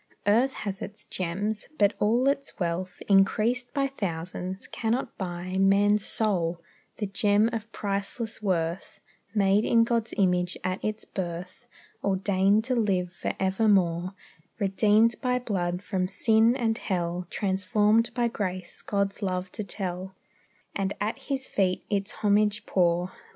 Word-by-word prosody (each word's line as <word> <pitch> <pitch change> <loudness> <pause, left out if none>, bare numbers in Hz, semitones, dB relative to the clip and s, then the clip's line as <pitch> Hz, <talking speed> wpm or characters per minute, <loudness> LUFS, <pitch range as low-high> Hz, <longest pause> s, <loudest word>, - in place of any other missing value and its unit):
Earth 235 +6 +3
has 195 -2 -5
its 205 +2 -8
gems; 200 +5 -2
but 205 0 +4
all 235 +5 +3
its 275 0 -1
wealth, 180 +1 -3
Increased 220 +5 +3
by 275 -1 +1
thousands, 185 -5 -4
cannot 235 +2 -2
buy 180 0 -4
Man's 200 +1 +4
soul, 180 -8 0 0.4
the 210 - -2
gem 205 +3 +2
of 225 0 -4
priceless 205 +3 -3
worth, 175 -3 -2 0.4
Made 200 0 +4
in 230 0 +4
God's 230 -1 -1
image 180 -2 +2
at 185 +1 -2
its 215 +1 -3
birth; 180 +4 -6 0.4
Ordained 195 +2 +2
to 255 +2 0
live 185 -6 0
for - - -3
evermore; 190 -2 +2 0.4
Redeemed 215 +2 +3
by 250 -1 +1
blood 185 -6 -2
from 185 -3 -1
sin 220 +4 +3
and 225 -4 0
hell; 175 -1 -2
Transformed 205 +3 +2
by 240 -2 +2
grace, 185 -5 -4
God's 200 0 -1
love 185 -1 -2
to 215 - -5
tell; 190 -1 -4 0.6
And 195 0 -1
at 210 +2 -2
His 270 -2 -3
feet 185 -5 0
its 200 0 0
homage 210 0 +2
pour. 175 0 +1
200 Hz, 135 wpm, -27 LUFS, 185-220 Hz, 0.6 s, but